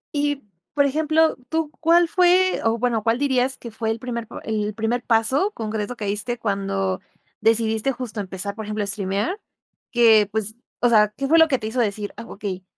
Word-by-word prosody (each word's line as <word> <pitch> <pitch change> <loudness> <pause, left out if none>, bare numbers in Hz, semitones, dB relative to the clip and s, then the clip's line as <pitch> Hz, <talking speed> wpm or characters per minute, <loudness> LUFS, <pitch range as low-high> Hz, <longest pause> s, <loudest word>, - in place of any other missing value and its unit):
Y, 290 -1 0 0.3
por 285 -1 +4
ejemplo 315 +3 +2
¿tú 320 -2 -1
cuál 335 +1 +4
fue? 365 +1 +3
o 225 +1 +1
bueno 235 -2 0
¿cuál 225 +1 +2
dirías 265 -1 +1
que 235 - -9
fue 220 0 -3
el 225 - -1
primer 235 -2 -5
p - - -12
el 215 -1 -2
primer 230 +2 -1
paso 250 - +2
concreto 220 +1 -3
que 215 - -5
diste 210 +5 -2
cuando 195 -3 -2 0.4
decidiste 225 +2 +2
justo 240 -4 -6
empezar, 195 +1 -5
por 220 - -6
ejemplo, 210 0 -2
a - - -2
estrimear?, 200 - -1 0.5
que 220 -4 +5
pues, 220 0 -1 0.2
o 245 - +3
sea, 210 -2 +5
¿qué 275 0 -2
fue 325 +2 +5
lo 320 - +7
que 265 - +2
te 215 - -4
hizo 235 +3 -3
decir: 210 -2 -1
"Ah, - - -7
okey, 190 -2 -6
225 Hz, 195 wpm, -22 LUFS, 210-270 Hz, 0.5 s, lo